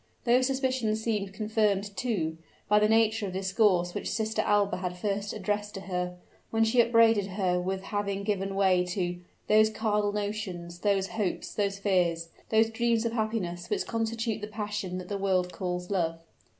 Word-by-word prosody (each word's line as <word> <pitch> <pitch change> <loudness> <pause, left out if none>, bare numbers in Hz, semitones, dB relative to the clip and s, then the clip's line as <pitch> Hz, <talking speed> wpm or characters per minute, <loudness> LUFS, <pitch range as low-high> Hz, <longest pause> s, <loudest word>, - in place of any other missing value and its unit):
Those 250 +1 +4
suspicions 260 -5 0
seemed 210 -4 -1
confirmed, 205 -1 0
too, 175 -11 -2 0.3
by 210 0 +5
the 210 0 +3
nature 220 -1 +3
of 185 - -6
the 190 - -2
discourse 190 -3 +2
which - - -3
Sister 220 0 0
Alba 205 -1 +2
had 180 -1 -4
first 200 +1 -2
addressed 210 0 -2
to 195 - -5
her, 180 -2 -3 0.3
when 225 0 +2
she 230 +2 +4
upbraided 230 -3 +4
her 185 -2 0
with 190 +1 -3
having 200 -1 -2
given 195 -1 -1
way 190 -2 +3
to 180 -1 -2 0.3
"those 215 0 +5
carnal 210 -2 0
notions 200 -5 -4
those 195 -1 +1
hopes 205 -5 -2
those 200 -1 -1
fears 175 -4 +1 0.2
those 225 0 +3
dreams 235 0 +1
of 230 - 0
happiness, 215 -6 -2
which - - 0
constitute 225 -1 -2
the 210 - -4
passion 210 -3 -4
that 180 -1 -6
the 200 0 -3
world 185 -2 +1
calls 180 0 -4
love." 165 -4 0
205 Hz, 175 wpm, -28 LUFS, 185-220 Hz, 0.3 s, by